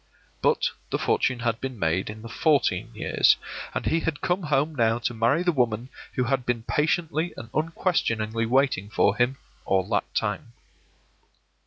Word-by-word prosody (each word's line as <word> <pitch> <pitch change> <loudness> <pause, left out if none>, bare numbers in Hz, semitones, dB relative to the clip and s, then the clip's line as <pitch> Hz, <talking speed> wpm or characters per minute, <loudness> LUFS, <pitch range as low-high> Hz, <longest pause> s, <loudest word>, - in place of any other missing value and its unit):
But - - +2 0.2
the - - 0
fortune 125 -3 +1
had 115 -1 -1
been 130 -2 -4
made 85 +1 0
in 110 +1 -8
the - - -7
fourteen 115 - +1
years, - - +3 0.4
and - - -2
he 165 - +2
had 165 -2 -2
come 180 +2 0
home 150 0 +1
now 115 -4 +2
to 120 0 -2
marry 120 +9 +2
the 180 - +3
woman 120 -4 0 0.2
who 125 - +1
had 130 +1 0
been 120 -2 -1
patiently 160 +4 0
and 115 - -9
unquestioningly 115 - 0
waiting 130 -6 +2
for 120 - +2
him 125 +2 +1 0.3
all 95 -1 +1
that - - 0
time. - - -2
125 Hz, 165 wpm, -26 LUFS, 115-150 Hz, 0.4 s, years